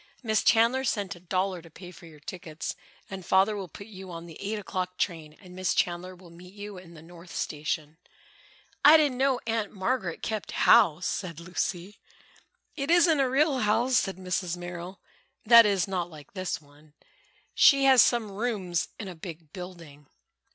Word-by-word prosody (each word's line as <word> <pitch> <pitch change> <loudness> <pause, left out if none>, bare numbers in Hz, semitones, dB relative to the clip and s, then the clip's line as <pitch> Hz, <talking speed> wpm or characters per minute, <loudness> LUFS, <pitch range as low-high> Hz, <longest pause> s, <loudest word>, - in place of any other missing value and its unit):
"Miss 220 -3 +1
Chandler 235 +4 +3
sent 200 -6 -2
a - - -14
dollar 185 +1 -2
to 165 - -15
pay 180 +3 -12
for 170 -1 -14
your 155 -2 -15
tickets, 165 0 -6 0.3
and 190 -1 -7
Father 190 +4 +3
will 195 -2 -5
put 200 - -11
you 190 -3 -11
on 170 -1 -8
the 165 -2 -12
eight 210 +2 -3
o'clock 185 -3 -4
train 160 -4 -3
and 180 -2 -14
Miss 185 -1 -1
Chandler 180 +1 -1
will 175 -1 -16
meet 180 +3 -14
you 205 -2 -8
in 170 -2 -15
the 155 - -13
North 170 +1 -14
Station." 150 +1 -3 0.9
"I 300 +3 +9
didn't 285 -5 +1
know 265 -2 +2
Aunt 225 -2 -1
Margaret 190 -3 -2
kept 215 -2 -4
house," 170 +2 +5
said 170 -5 -3
Lucy. 175 +3 -4 0.8
"It 280 -1 -4
isn't 340 -3 +5
a 270 -2 +2
real 275 +1 +2
house," 230 +4 +2
said 195 -2 -1
Mrs. 180 -1 -2
Merrill, 175 +1 -8 0.5
"that 230 0 +8
is, 195 -3 +1
not 180 -3 -2
like 150 -3 -14
this 185 -6 -3
one. 145 +1 -22 0.6
She 275 -2 +6
has 265 -2 +7
some 230 -4 +2
rooms 195 -5 -2
in 205 - -6
a 185 - -6
big 160 -2 -10
building." 170 -6 -10
185 Hz, 180 wpm, -27 LUFS, 170-215 Hz, 0.9 s, I